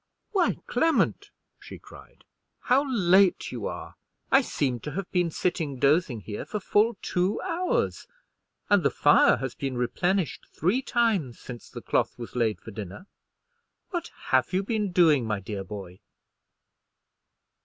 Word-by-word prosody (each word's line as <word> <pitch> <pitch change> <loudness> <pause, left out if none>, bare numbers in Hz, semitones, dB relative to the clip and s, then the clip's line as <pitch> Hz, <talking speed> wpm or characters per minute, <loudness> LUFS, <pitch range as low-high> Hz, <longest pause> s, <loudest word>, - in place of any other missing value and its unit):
"Why, 380 -4 +2
Clement," 325 0 +1 0.3
she - - -10
cried, - - -16 0.4
"how 270 +2 +2
late 190 -4 +3
you - - -4
are! - - -7 0.3
I 270 - +7
seem 130 - -1
to 150 +4 -7
have 190 +2 -5
been 175 -2 +1
sitting 160 -4 -2
dozing 140 -3 +2
here 105 +3 -6
for 210 - -4
full 210 +3 +2
two 180 +3 0
hours; 370 +7 -1 0.6
and 205 -2 +4
the - - +3
fire 145 - +5
has 135 -2 -4
been 135 -3 -4
replenished 175 +9 -1
three 190 - +1
times 215 - 0
since 120 -2 -10
the - - -8
cloth - - 0
was 120 0 -9
laid 115 -3 +1
for 115 - -10
dinner. 105 - -8 0.9
What 345 -3 -3 0.2
have - - +2
you 190 +2 +1
been 210 -2 -1
doing, 160 -7 +4
my 105 -2 -1
dear 100 0 -5
boy?" 95 -2 -9
175 Hz, 145 wpm, -27 LUFS, -, 0.9 s, I